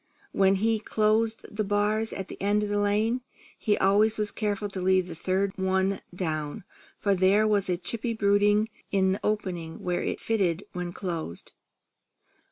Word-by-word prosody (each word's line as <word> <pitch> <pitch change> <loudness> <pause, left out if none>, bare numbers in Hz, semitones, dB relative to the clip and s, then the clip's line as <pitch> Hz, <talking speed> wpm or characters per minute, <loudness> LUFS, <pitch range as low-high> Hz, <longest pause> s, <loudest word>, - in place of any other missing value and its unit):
When 195 0 +3
he 220 +3 +1
closed 220 +1 +1
the 215 - 0
bars 210 +2 0
at 195 -1 -5
the - - -10
end 205 +1 +2
of 210 - -2
the 205 0 +1
lane, 215 +4 +1 0.3
he 210 - 0
always 210 +3 +3
was 210 -1 0
careful 205 -1 -2
to 190 -1 -5
leave 185 0 +3
the 175 - -6
third 190 +4 -1
one 190 +1 +1
down, 155 -5 -3 0.3
for 200 - +1
there 195 +3 +4
was 205 -3 +2
a 180 - +1
chippy 230 +5 -3
brooding 205 +1 +3 0.2
in 190 -1 +3
the 195 - -1
opening 180 -6 -3
where 180 -1 -1
it - - -2
fitted 195 -5 0
when 180 -1 -4
closed. 165 - -5
200 Hz, 170 wpm, -27 LUFS, 185-215 Hz, 0.3 s, there